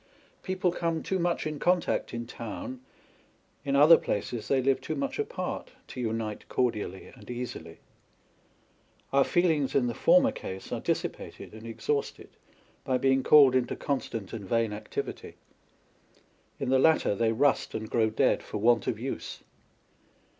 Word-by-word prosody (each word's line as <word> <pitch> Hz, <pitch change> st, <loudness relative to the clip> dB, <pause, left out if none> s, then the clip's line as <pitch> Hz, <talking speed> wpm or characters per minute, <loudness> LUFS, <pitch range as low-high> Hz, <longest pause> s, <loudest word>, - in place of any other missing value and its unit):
People 185 Hz, -1 st, 0 dB
come 165 Hz, -2 st, -2 dB
too 190 Hz, -, -1 dB
much 175 Hz, -1 st, 0 dB
in 155 Hz, -1 st, -4 dB
contact 180 Hz, +1 st, +1 dB
in 120 Hz, 0 st, -4 dB
town, 120 Hz, +2 st, -7 dB, 0.8 s
in 140 Hz, 0 st, 0 dB
other 150 Hz, +4 st, +8 dB
places 110 Hz, +2 st, -3 dB
they 135 Hz, -, +2 dB
live 135 Hz, +1 st, +1 dB
too -, -, -4 dB
much 275 Hz, +6 st, -3 dB
apart, -, -, -4 dB, 0.2 s
to 125 Hz, -, -6 dB
unite 110 Hz, -2 st, -3 dB
cordially 105 Hz, -6 st, -2 dB
and 115 Hz, -3 st, -15 dB
easily. 125 Hz, 0 st, -6 dB, 1.4 s
Our 140 Hz, 0 st, +5 dB
feelings, 160 Hz, -4 st, +1 dB
in 135 Hz, -, +3 dB
the 120 Hz, -, -1 dB
former 270 Hz, -, +4 dB
case, 95 Hz, -, -8 dB
are -, -, -2 dB
dissipated -, -, -4 dB
and 110 Hz, +1 st, -10 dB
exhausted 140 Hz, +5 st, -3 dB, 0.5 s
by 130 Hz, -, +1 dB
being 135 Hz, +1 st, +2 dB
called 140 Hz, -2 st, +7 dB
into 125 Hz, -1 st, +1 dB
constant 115 Hz, -8 st, -3 dB
and 100 Hz, -5 st, -7 dB
vain 115 Hz, -2 st, +1 dB
activity; 105 Hz, +1 st, -6 dB, 1.2 s
in -, -, -2 dB
the 130 Hz, 0 st, +4 dB
latter 160 Hz, -5 st, +4 dB
they 110 Hz, +2 st, +1 dB
rust 135 Hz, +5 st, +1 dB
and 110 Hz, 0 st, -4 dB
grow 110 Hz, 0 st, +2 dB
dead 110 Hz, -, +2 dB
for -, -, -6 dB
want 115 Hz, +1 st, +3 dB
of -, -, 0 dB
use. -, -, -5 dB
130 Hz, 150 wpm, -28 LUFS, 115-155 Hz, 1.4 s, other